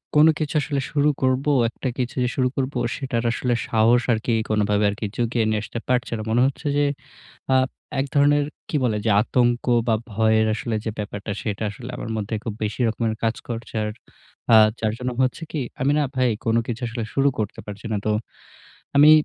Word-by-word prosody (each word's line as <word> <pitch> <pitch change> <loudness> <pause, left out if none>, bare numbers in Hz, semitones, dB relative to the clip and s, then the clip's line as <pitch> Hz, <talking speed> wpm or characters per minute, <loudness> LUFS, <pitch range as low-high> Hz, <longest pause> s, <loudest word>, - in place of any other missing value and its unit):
কোন 150 +2 +7
কিছু 155 0 -2
আসলে 140 -2 -1
শুরু 150 0 +3
করবো, 130 +2 +2 0.2
একটা 130 - -5
কিছু 125 -1 -2
যে 125 - +1
শুরু 130 -1 +2
করবো, 135 +1 -1 0.2
সেটার 125 -4 -2
আসলে 120 +1 0
সাহস 115 +2 +4
আরকি 115 +1 0 0.2
কোনভাবে 105 -1 +2
আর 100 - -3
কি - - -2
জুগিয়ে 120 -1 0
নিয়ে 110 -1 +1
আসতে 115 - -5
পারছে 125 -1 0
না। - - -4
মনে 120 +2 +3
হচ্ছে 140 +2 -4
যে 145 - +3 0.7
আ - - +5 0.4
এক 135 - +1
ধরনের 145 0 +4 0.2
কি - - -3
বলে, 110 -4 +1
যে 110 - +3
আতঙ্ক 120 0 +1 0.2
বা 110 - +4 0.2
ভয়ের 110 +1 +3
আসলে 115 +1 -2
যে - - 0
ব্যাপারটা, 105 0 -5
সেটা 105 0 -3
আসলে 120 +4 -9
আমার 115 - -5
মধ্যে 105 +1 -4
খুব 110 - -3
বেশি 105 +3 -3
রকমের 110 0 -1
কাজ 115 0 +1
করছে 115 0 -6
আর 105 - -1 0.6
আ - - +10 0.2
যার 110 -1 0
জন্য 125 0 -2
হচ্ছে 130 +6 -1
কি? 150 - -2 0.2
আমি 135 - +3
না 150 - +3
ভাই 130 -1 +3 0.2
কোন 115 - +2
কিছু 120 +1 -4
আসলে 115 0 -4
শুরু 140 0 +3
করতে 105 -2 -3
পারছি 105 +2 -9
না। 105 - +1
তো 110 - +2 0.9
আমি 150 +2 +8
120 Hz, 200 wpm, -23 LUFS, 110-130 Hz, 0.9 s, আ